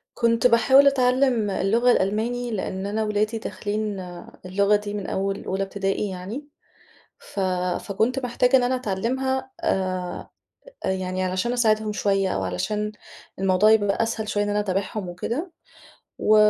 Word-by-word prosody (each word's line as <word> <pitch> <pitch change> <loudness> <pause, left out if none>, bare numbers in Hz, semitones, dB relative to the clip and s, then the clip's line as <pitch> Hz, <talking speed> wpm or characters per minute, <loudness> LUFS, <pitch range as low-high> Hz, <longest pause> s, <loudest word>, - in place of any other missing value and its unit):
كنت 230 0 +2
باحاول 265 +4 +6
أتعلّم 255 -4 +3
اللغة 225 +6 +2
الألماني، 235 +5 0
لإن 190 -2 -3
أنا 215 +2 -1
ولادي 215 +1 0
داخلين 210 -2 -3 0.5
اللغة 200 +2 +3
دي 205 0 -5
من 205 -2 -4
أول 195 +1 -2
أولى 190 +1 -2
ابتدائي 195 +1 -1
يعني، 200 +11 -6 0.7
ف - - -8 0.4
فكنت 225 +7 0
محتاجة 250 0 +3
إن 250 - +1
أنا 250 +1 +1
أتعلّمها 260 +4 -2
آآ، 185 -2 -2 0.6
أ - - 0
يعني 185 0 -2
علشان 185 +6 -1
أساعدهم 215 -3 +2
شوية 195 -2 +1
أو 95 - -1
علشان 210 - -2 0.5
الموضوع 195 +2 +4
يبقى 205 0 +3
أسهل 225 -1 -3
شوية 205 -1 +1
إن 205 - -2
أنا 205 - +1
اتابعهم 195 0 -2
وكده. 245 - -4 0.7
و 215 - +4
210 Hz, 140 wpm, -24 LUFS, 195-240 Hz, 0.7 s, باحاول